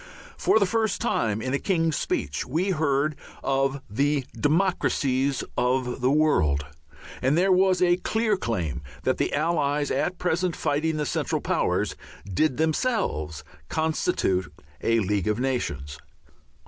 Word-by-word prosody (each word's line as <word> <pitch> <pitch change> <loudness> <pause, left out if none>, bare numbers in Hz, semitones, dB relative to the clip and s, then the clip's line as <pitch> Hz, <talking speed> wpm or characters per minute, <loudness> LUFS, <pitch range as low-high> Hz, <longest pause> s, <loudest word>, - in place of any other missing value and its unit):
For - - +3
the 205 - +4
first 220 0 0
time 110 -1 0
in 130 - -2
a 140 - +1
King's 165 -5 +1
Speech 75 +1 -2
we 170 +9 0
heard 155 -2 +1 0.3
of 135 0 0
the 140 +5 0
"democracies" 145 -5 +1
of 125 0 0
the 125 - +3
world, 105 - +2 0.6
and 135 +5 +2
there 190 +2 +3
was 185 0 +4
a 175 0 +4
clear 220 +3 +1
claim 90 - -2 0.2
that - - 0
the - - +1
Allies 145 -2 0
at 175 +7 0
present 180 0 0
fighting 155 +2 0
the 150 - -1
Central - - -1
Powers - - 0 0.3
did 125 - 0
themselves 155 - -1 0.3
constitute 95 - 0 0.3
a 115 0 +2
League 100 -1 0
of 105 +1 0
Nations. 75 - -2
145 Hz, 135 wpm, -25 LUFS, 120-170 Hz, 0.6 s, the